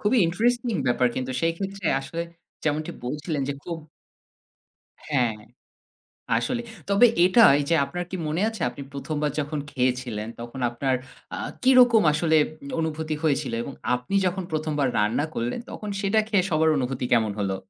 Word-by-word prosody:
খুবই 215 +5 +3
ইন্টারেস্টিং 235 +6 +1
ব্যাপার! 125 0 +3
কিন্তু 130 0 -3
সেই 165 0 +2
ক্ষেত্রে 195 -2 -4
আসলে 165 +5 -4 0.4
যেমনটি 155 0 0
বলছিলেন 150 +3 -2
যে - - 0
খুব 170 -2 -5 1.3
হ্যাঁ, 125 -6 +1 1.0
আসলে। 240 - -1 0.3
তবে 200 +5 +6 0.2
এটা 185 +6 +6 0.2
এইযে 145 +4 +1
আপনার 175 +6 -4
কি 190 - -3
মনে 155 +4 -1
আছে? 225 -1 -7
আপনি 130 +3 -9
১ম 140 +2 -4
বার 150 - +2
যখন 150 +1 -3
খেয়েছিলেন 125 -4 -1
তখন 120 +3 -7
আপনার 130 +2 0 0.4
আ - - -3 0.3
কিরকম 250 -3 +6
আসলে 160 +1 +2
উম - - -9 0.3
অনুভূতি 160 -1 -2
হয়েছিল? 145 -6 +1
এবং 140 - -6 0.2
আপনি 125 +8 -4
যখন 185 +1 -1
১ম 155 0 -1
বার 140 -2 +2
রান্না 105 +7 +1
করলেন 120 - -2
তখন 210 - -7
সেটা 200 +2 +2
খেয়ে 200 -5 +2
সবার 160 0 +3
অনুভূতি 130 -1 -2
কেমন 110 -3 +3
হলো? 95 -1 -1
155 Hz, 160 wpm, -25 LUFS, 130-190 Hz, 1.3 s, তবে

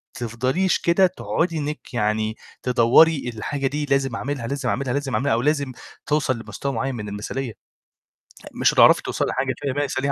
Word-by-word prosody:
تفضليش 130 - 0
كده 180 +2 +4
تقعدي 170 -2 -2
إنِك 150 -2 -5
يعني 110 0 0 0.3
تدوّري 125 +4 +4
الحاجة 135 +5 -2
دي 145 +2 -2
لازم 135 -3 0
أعملها، 130 -2 -3
لازم 140 +2 -2
أعملها، 130 -2 -1
لازم 140 -2 -2
أعملها، 135 -3 +1
أو 115 - +1
لازم 140 -2 0 0.3
توصل 145 -5 +1
لمستوى 140 +4 -5
معيّن 130 +3 -2
من 105 -2 -5
المثاليّة، 110 +4 -4 1.0
مش - - +2
هتعرفي - - +6
توصلي - - -1
لحاجة 135 +1 -1
تانية 140 0 -1
135 Hz, 155 wpm, -23 LUFS, 120-145 Hz, 1.0 s, هتعرفي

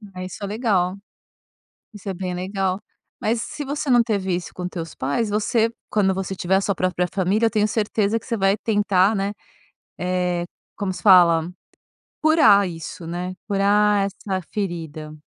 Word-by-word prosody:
É, 185 0 -5
isso 185 +3 -8
é - - -2
legal, 200 -4 0 1.0
isso 205 -1 -9
é 190 - -2
bem 180 0 -4
legal. 190 +1 -2 0.4
Mas 225 +1 0
se 295 - -6
você 285 0 -3
não 240 -1 +6
teve 200 -5 -1
isso 175 0 -3
com 180 - -6
os - - -1
teus 165 -3 -6
pais, 145 - -1
você 220 +2 +1 0.2
quando 195 -3 +2
você 190 0 -3
tiver 190 +1 +1
a - - +3
sua 200 0 0
própria 180 -1 0
família, 200 +4 +2
eu - - +2
tenho 210 0 +2
certeza 215 0 0
que - - -17
você 235 -3 -1
vai 195 -1 +2
tentar, 205 -2 +2
né, 200 0 -1 0.7
eh, 180 -1 -1 0.3
como 200 -2 -2
se 180 - -9
fala, 175 -4 +6 0.7
curar 300 - +5
isso, 165 0 -7
né, 175 +2 -4
curar 205 0 +3
essa 195 -1 -4
ferida. 165 -6 -4
195 Hz, 175 wpm, -22 LUFS, 180-210 Hz, 1.0 s, não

